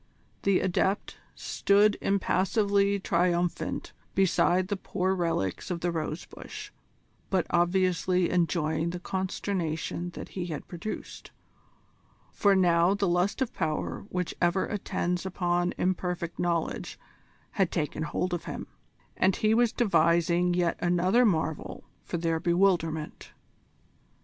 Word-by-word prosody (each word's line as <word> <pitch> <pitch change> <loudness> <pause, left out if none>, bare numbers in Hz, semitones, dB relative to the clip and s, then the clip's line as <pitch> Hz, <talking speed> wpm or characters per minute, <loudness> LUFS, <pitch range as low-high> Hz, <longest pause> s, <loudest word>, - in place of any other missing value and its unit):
The 195 -1 +2
Adept 190 +2 0 0.2
stood 205 +1 +3
impassively 200 +1 +2
triumphant 175 -1 0 0.2
beside 185 -1 +3
the 205 - 0
poor 185 0 -1
relics 165 - -1
of 175 -2 -3
the 175 - 0
rose 155 -1 -3
bush, - - -9 0.6
but 185 -3 +1
obviously 180 0 +2
enjoying 165 -2 +1
the 175 +1 -4
consternation 180 -2 -3
that - - -7
he 180 -2 -4
had 155 -4 -6
produced 175 +5 -7 1.0
for 200 -1 +3
now 175 0 +4
the 200 -1 0
lust 180 +8 +1
of 250 - -6
power 160 +3 -3
which 180 -1 -2
ever 175 +2 +2
attends 180 -3 -2
upon 175 -1 0
imperfect 180 -2 -2
knowledge 170 -2 -1 0.5
had 190 -4 +1
taken 155 -2 -2
hold 175 +3 -2
of 175 - -3
him, - - -5 0.5
and 190 0 +3
he 215 0 +2
was 235 0 +3
devising 175 -5 +2
yet 175 -1 +1
another 180 +7 +3
marvel 160 -4 -2 0.2
for 175 - -3
their 165 -1 0
bewilderment. 170 -3 0
180 Hz, 120 wpm, -28 LUFS, 170-190 Hz, 1.0 s, now